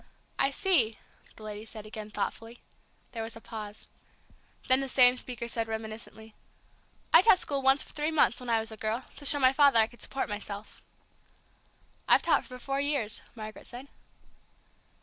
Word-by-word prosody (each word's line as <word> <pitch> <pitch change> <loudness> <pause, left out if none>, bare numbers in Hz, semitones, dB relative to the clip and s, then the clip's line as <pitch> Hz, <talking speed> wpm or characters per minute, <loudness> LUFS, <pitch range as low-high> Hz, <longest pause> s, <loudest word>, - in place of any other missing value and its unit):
"I 275 - +3
see," 275 - +2 0.4
the 215 - -14
lady 210 0 -7
said 220 -1 -8
again 215 0 -8
thoughtfully. 225 +2 -5 0.5
There 230 -3 -5
was 225 0 -6
a - - -10
pause. 215 -2 -8 0.8
Then 260 +1 +4
the 270 -1 -3
same 250 -1 +6
speaker 245 -1 -7
said 230 -1 -3
reminiscently, 220 0 -7 0.8
"I - - +9
taught 385 -1 +6
school 280 -5 -1
once 270 +1 +4
for - - -14
three 300 +1 -1
months 315 -2 +2
when 250 -1 -8
I 230 -1 +3
was 220 0 -5
a 220 - -9
girl, 220 +4 -3
to 285 - -9
show 290 - +6
my 260 -1 +4
father 280 -3 +5
I 220 - +7
could 240 +2 -15
support 270 - -3
myself." 205 0 -7 1.3
"I've - - +5
taught - - +2
for 255 - -9
four 275 +2 -2
years," 280 -7 -1
Margaret 215 -1 -9
said. 255 +3 -9
235 Hz, 175 wpm, -29 LUFS, 220-270 Hz, 1.3 s, I